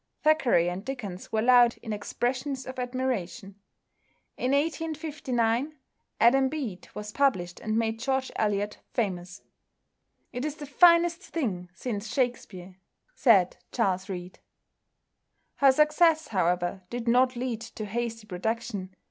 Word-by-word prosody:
Thackeray 270 Hz, -, +4 dB
and 180 Hz, +2 st, -3 dB
Dickens 215 Hz, -8 st, -6 dB
were 220 Hz, 0 st, +1 dB
loud 245 Hz, -1 st, +6 dB
in 220 Hz, -, -4 dB
expressions 255 Hz, +5 st, -2 dB
of 260 Hz, 0 st, -7 dB
admiration. 245 Hz, -7 st, -3 dB, 0.8 s
In 250 Hz, -, -2 dB
1859 295 Hz, -4 st, -1 dB, 0.4 s
"Adam 265 Hz, +3 st, +5 dB
Bede" 250 Hz, -12 st, -5 dB
was 210 Hz, 0 st, -6 dB
published 190 Hz, -11 st, 0 dB
and 215 Hz, 0 st, -2 dB
made 225 Hz, 0 st, 0 dB
George 265 Hz, +1 st, -1 dB
Eliot 205 Hz, -1 st, -1 dB
famous. 185 Hz, -4 st, -3 dB, 0.9 s
"It 245 Hz, -, -3 dB
is 300 Hz, -1 st, -3 dB
the 300 Hz, -, -8 dB
finest 340 Hz, +3 st, +5 dB
thing 210 Hz, -, -3 dB
since 215 Hz, -2 st, -4 dB
Shakspere," 215 Hz, -8 st, -3 dB, 0.4 s
said 205 Hz, -, +4 dB
Charles 190 Hz, -5 st, 0 dB
Reade. 180 Hz, -1 st, -7 dB, 1.2 s
Her 275 Hz, -1 st, +6 dB
success, 305 Hz, +2 st, +3 dB
however, 180 Hz, -1 st, 0 dB
did 240 Hz, -1 st, -5 dB
not 250 Hz, +2 st, +4 dB
lead 240 Hz, -2 st, -3 dB
to 225 Hz, -2 st, -7 dB
hasty 230 Hz, +1 st, -4 dB
production. 205 Hz, -1 st, -4 dB
235 Hz, 120 wpm, -27 LUFS, 200-270 Hz, 1.2 s, loud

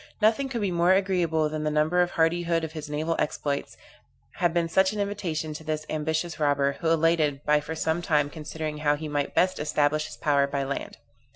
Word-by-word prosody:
Nothing 225 Hz, +5 st, +2 dB
could 235 Hz, -4 st, -3 dB
be 200 Hz, -2 st, 0 dB
more 175 Hz, +1 st, +4 dB
agreeable 175 Hz, -5 st, +1 dB
than 155 Hz, 0 st, -4 dB
the 155 Hz, -, +1 dB
number 155 Hz, +4 st, +2 dB
and 175 Hz, -, +2 dB
hardihood 165 Hz, 0 st, +1 dB
of 160 Hz, -, -4 dB
his 155 Hz, -2 st, -7 dB
naval 155 Hz, +3 st, -1 dB
exploits, 145 Hz, -1 st, -2 dB, 0.6 s
had 175 Hz, -2 st, +2 dB
been 170 Hz, 0 st, +1 dB
such 190 Hz, +4 st, +3 dB
an 210 Hz, -, -4 dB
invitation 180 Hz, -7 st, -2 dB
to 155 Hz, -, -8 dB
this 155 Hz, -1 st, -3 dB
ambitious 160 Hz, +2 st, -2 dB
robber, 140 Hz, -2 st, +1 dB
who 165 Hz, -, 0 dB
elated 160 Hz, -3 st, +2 dB
by 150 Hz, 0 st, +4 dB
for 150 Hz, +2 st, -6 dB
some 160 Hz, +2 st, 0 dB
time 150 Hz, -4 st, +2 dB
considering 155 Hz, 0 st, -5 dB
how 150 Hz, -1 st, +2 dB
he 155 Hz, +1 st, -6 dB
might 145 Hz, -1 st, -2 dB
best 185 Hz, 0 st, +2 dB
establish 150 Hz, 0 st, +1 dB
his -, -, -10 dB
power 140 Hz, -2 st, +2 dB
by 140 Hz, 0 st, -2 dB
land. 140 Hz, +1 st, -5 dB
160 Hz, 205 wpm, -26 LUFS, 150-175 Hz, 0.6 s, more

